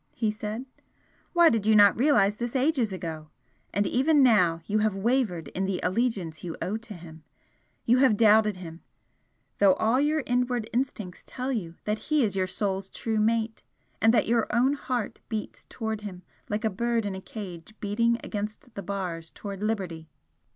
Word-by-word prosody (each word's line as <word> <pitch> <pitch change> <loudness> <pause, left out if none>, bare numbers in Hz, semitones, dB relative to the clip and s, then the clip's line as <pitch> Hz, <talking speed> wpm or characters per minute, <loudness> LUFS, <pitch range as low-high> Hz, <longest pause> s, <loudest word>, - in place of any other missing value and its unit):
he 220 -3 0
said 215 +3 -5 0.7
"Why 345 -2 +7
did 220 -5 0
you 220 - +5
not 205 -2 +7
realise 210 -6 +3
this 240 +2 -4
ages 260 -5 +2
ago? 160 -4 -6 0.4
And 205 +2 +1
even 275 +6 +3
now 180 -9 +4
you 215 +1 +1
have 215 -2 +1
wavered 210 -5 0
in 190 - -2
the 190 -1 -1
allegiance 185 -7 -1
you 170 -2 -5
owe 200 - -2
to 225 -2 -10
him 160 -2 -12 0.6
you 245 +2 +4
have 255 -6 +4
doubted 215 -1 +5
him, 170 -2 -9 0.8
though 195 -2 +6
all 225 +4 +2
your 300 0 +1
inward 245 -2 0
instincts 230 -7 -3
tell 260 +1 -4
you 175 -9 -3
that 210 +1 -1
he 305 -3 +3
is 200 -4 0
your 185 -1 +1
soul's 195 0 -2
true 220 -1 -2
mate, 225 +1 0 0.4
and 225 - +6
that 235 - +3
your 230 -1 +2
own 255 +4 +3
heart 250 -6 -3
beats 220 -2 -5
towards 220 -2 -4
him 185 -3 -8 0.3
like 210 +2 -2
a 220 - +1
bird 235 +2 0
in 200 - -2
a 190 - -6
cage 190 -2 -9
beating 230 +3 +1
against 215 +4 -5
the 200 - -5
bars 175 -4 -4
towards 200 -1 -7
liberty!" 185 -7 -3
215 Hz, 180 wpm, -27 LUFS, 190-235 Hz, 0.8 s, Why